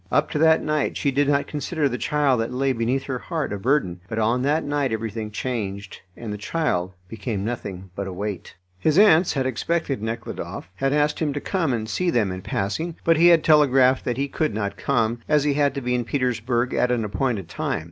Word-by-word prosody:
Up - - +2
to 150 - -1
that 160 0 +4
night 150 -1 0
she 140 - +1
did 140 +1 +2
not 140 -1 +2
consider 150 +1 -1
the 125 - -2
child 140 -2 +2
that 115 - -3
lay 135 +1 +1
beneath 125 +3 0
her 130 -2 -4
heart 160 -6 -3
a 100 - -4
burden. 110 -7 +1
But 115 - -4
on 115 +3 +2
that 150 +4 +1
night 145 -3 -1
everything 110 0 -3
changed, 105 -4 -4 0.2
and 110 -3 -5
the 105 - -6
child 95 - -1
became 105 0 -4
nothing 95 -5 -5
but 100 -1 -4
a - - -5
weight. 100 0 -5 0.2
His 155 - +2
aunts 190 -4 +6
had 135 -2 -1
expected 135 +1 -1
Nekhludoff, 115 -4 -5
had 135 0 0
asked 150 +1 +1
him 150 -3 0
to 145 - -2
come 165 -3 -1
and 110 -3 -2
see 180 +10 0
them 110 - +1
in 95 0 -5
passing, 160 - -2
but 165 -1 +4
he 170 +2 +6
had 170 -3 +6
telegraphed 135 -4 +4
that 120 -1 -1
he 140 +1 0
could 145 -5 -1
not 100 -2 -2
come, 120 -3 0
as 150 -2 +4
he 145 -1 +2
had 145 -1 +1
to 140 - -3
be 125 0 -1
in 125 -1 +1
Petersburg 120 -1 -1
at 125 - +2
an 120 -3 0
appointed 105 -2 -2
time. 80 - -2
125 Hz, 220 wpm, -23 LUFS, 110-150 Hz, 0.2 s, aunts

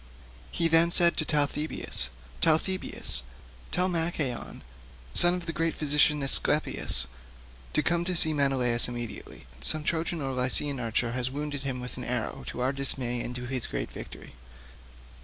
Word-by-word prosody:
He 165 - 0
then 165 +1 +5
said 170 0 +5
to 155 - +2
Talthybius, 150 +1 -2 0.3
"Talthybius, 160 - 0 0.5
tell 180 +1 0
Machaon, 165 -7 -3 0.5
son 175 +1 +5
to 175 - -11
the 165 - -5
great 165 +1 -1
physician, 150 0 +2
Aesculapius, 135 - +2 0.7
to 150 - +1
come 170 0 +1
and 180 -2 0
see 160 -1 +4
Menelaus 130 -5 +6
immediately. 120 - -8 0.2
Some 150 - -2
Trojan 165 +1 -1
or 135 -2 -3
Lycian 130 +2 0
archer 115 0 -1
has 125 +1 -2
wounded 145 +1 -5
him 135 -2 -4
with 125 0 -7
an - - -5
arrow - - -4
to 125 - -6
our 130 +2 0
dismay, 130 -3 +1
and 125 - -6
to 125 0 -6
his 130 -1 -3
own - - -14
great - - -19 0.2
glory." - - -12
145 Hz, 160 wpm, -27 LUFS, 125-165 Hz, 0.7 s, Menelaus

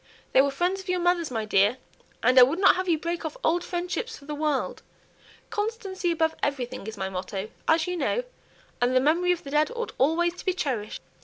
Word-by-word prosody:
They 265 - +7
were 280 - +2
friends 355 +7 0
of 375 - -12
your 365 0 +1
mother's, 350 -2 +1
my 225 -3 -2
dear, 205 +3 +3 0.5
and 255 +2 +6
I - - +10
would 270 +7 +5
not 390 - +6
have 370 0 -2
you 330 - +3
break 335 +2 -3
off 315 -2 -5
old 345 +2 +2
friendships 360 +7 -3
for 280 - -16
the 300 - -5
world. 295 -2 -1 0.7
'Constancy 415 -4 -2
above 320 -1 +1
everything' 255 -7 -3
is 220 -1 -6
my 190 - -2
motto, 190 +2 -5 0.2
as 320 0 +3
you 360 -1 -2
know, - - 0 0.6
and 245 +1 +2
the - - +6
memory 335 +6 +2
of 355 - -1
the 275 - -8
dead 300 +1 +3
ought 470 0 -4
always 330 +6 +2
to - - -10
be 370 - +2
cherished." 240 - -3
320 Hz, 220 wpm, -26 LUFS, 255-360 Hz, 0.7 s, I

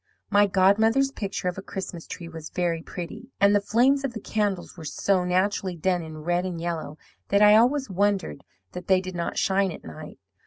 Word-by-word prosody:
"My 205 0 +5
godmother's 220 +8 +3
picture 200 -6 -4
of 180 +1 -2
a - - -6
Christmas 190 -3 -7
tree 170 - -7
was 160 -2 -8
very 170 -2 -1
pretty; 175 +9 -8
and 200 +1 +5
the 205 - +3
flames 260 +7 +2
of 270 -3 -2
the 225 - -5
candles 205 -4 -2
were 170 - -10
so 180 +5 0
naturally 185 0 0
done 180 +2 0
in 155 -1 -9
red 175 +2 0
and 180 -3 -4
yellow 165 -3 -4 0.3
that 200 +1 +4
I 210 0 +8
always 260 +5 +3
wondered 195 - -1 0.3
that 180 - -8
they 190 -1 +4
did 185 0 -6
not 170 -1 -3
shine 195 -1 +2
at - - -10
night. 80 - -10
190 Hz, 200 wpm, -25 LUFS, 175-205 Hz, 0.3 s, I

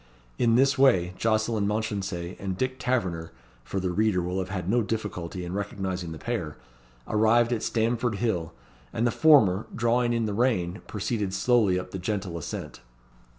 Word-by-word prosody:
In 115 -1 +4
this 135 +2 +3
way, 95 -10 +4
Jocelyn 110 0 +1
Mounchensey 100 -5 -3
and 95 -2 -3
Dick 130 +2 -2
Taverner 95 -11 -1 0.3
(for 95 - -3
the 90 -1 -1
reader 105 0 +2
will 90 +2 -2
have 95 - -3
had 90 -3 -4
no 120 +5 +3
difficulty 100 -5 -4
in 90 - -5
recognising 95 -4 -3
the 80 - -6
pair) - - -4 0.5
arrived 115 +3 +3
at 115 - -2
Stamford 115 0 0
Hill; 95 -7 -1 0.4
and 115 - 0
the 120 - +3
former, 110 - +5
drawing 120 +1 +2
in 115 -1 +1
the 105 - -2
rein, 105 -5 0
proceeded 105 -1 -2
slowly 105 -3 +3
up 90 - -8
the 95 - -5
gentle 95 -2 -3
ascent. 75 - -6
105 Hz, 165 wpm, -27 LUFS, 90-115 Hz, 0.5 s, former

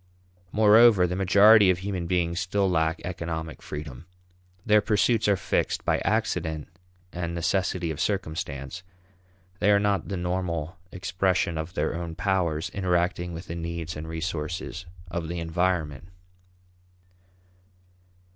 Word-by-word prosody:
Moreover, 110 -2 +6
the 90 0 -2
majority 100 +2 +6
of 90 - +3
human 95 -2 -4
beings 85 -1 0
still 100 +1 0
lack 80 -2 +1
economic 80 -3 -5
freedom. 75 0 -8 0.6
Their 105 0 +5
pursuits 105 +2 +2
are 100 -2 +3
fixed - - -1
by - - +2
accident 80 -1 -1 0.4
and 85 -1 -3
necessity 85 0 0
of 80 +1 -5
circumstance; 80 -4 -3 0.8
they 105 - +3
are 100 -1 +5
not 100 -1 0
the 95 - -3
normal 90 -2 -2 0.2
expression 90 -1 0
of 80 +3 -5
their - - 0
own 85 -1 -5
powers 90 -4 0
interacting 90 -2 0
with 85 +1 -7
the 85 - -6
needs 85 0 -5
and 75 +1 -6
resources 85 +2 -4 0.2
of 85 -2 -3
the 85 +2 -4
environment. 85 -3 -1
90 Hz, 125 wpm, -26 LUFS, 80-95 Hz, 0.8 s, Moreover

